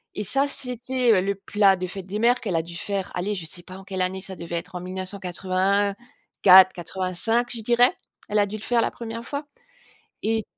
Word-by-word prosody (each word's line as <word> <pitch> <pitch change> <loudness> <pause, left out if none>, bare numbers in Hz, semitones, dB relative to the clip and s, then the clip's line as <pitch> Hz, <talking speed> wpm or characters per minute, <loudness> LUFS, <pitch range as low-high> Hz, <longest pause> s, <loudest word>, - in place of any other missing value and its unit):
Et 210 - -2
ça, 275 +7 +1
c'était, 250 -2 -1
heu, 185 - +3
le 200 +1 -1
plat 200 0 +3
de 185 0 -4
fête 190 0 -7
des 205 +3 -4
mères 245 +2 +4
qu'elle 195 -6 -2
a 165 - +2
dû 170 0 -10
faire. 195 +2 -3
Allez, 200 +4 -1
je 170 -3 -5
sais 175 +2 -2
pas 185 +1 -10
en 190 - -12
quelle 190 -1 -4
année, 190 +1 -1
ça 190 -1 -8
devait 170 0 -6
être 170 - -5
en 175 - -4
1984-85, 190 +2 +2
je 225 - -3
dirais. 245 - +4 0.3
Elle 210 0 +2
a 205 - +4
dû 210 - -6
le - - -12
faire 240 -1 +2
la - - 0
1re 230 0 -7
fois 285 +1 -5 0.8
et 220 0 0
200 Hz, 210 wpm, -24 LUFS, 185-230 Hz, 0.8 s, mères